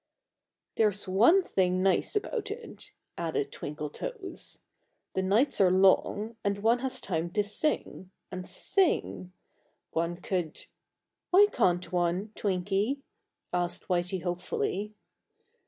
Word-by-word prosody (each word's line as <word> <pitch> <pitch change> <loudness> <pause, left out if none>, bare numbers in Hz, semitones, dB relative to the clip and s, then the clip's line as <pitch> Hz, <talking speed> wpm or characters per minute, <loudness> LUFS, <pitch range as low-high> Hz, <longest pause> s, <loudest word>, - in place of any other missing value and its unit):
"There's 205 -3 +2
one 235 - +5
nice 185 0 +3
thing 415 0 0
about 455 -4 -3
it," 455 +3 -8 0.3
added 160 -4 -2
Twinkletoes: 365 - -5 0.5
"the 190 - 0
nights 215 +8 +3
are 190 - +6
long, 195 +4 +3
and 200 0 0
one 230 +2 +4
has 260 0 -2
time 170 -2 -2
to 210 - +2
sing 205 -3 -1 0.2
and 185 -1 -6
sing! 345 - +1 0.6
One 170 +1 -1
could 180 -3 -3 0.3
" - - -58
"Why 390 +3 +7
can't 180 -6 +1
one, 180 +3 0
Twinky?" 200 +7 -1 0.5
asked 175 -1 -1
Whitey 180 0 0
hopefully. 185 +3 -2
190 Hz, 115 wpm, -29 LUFS, 180-230 Hz, 0.6 s, Why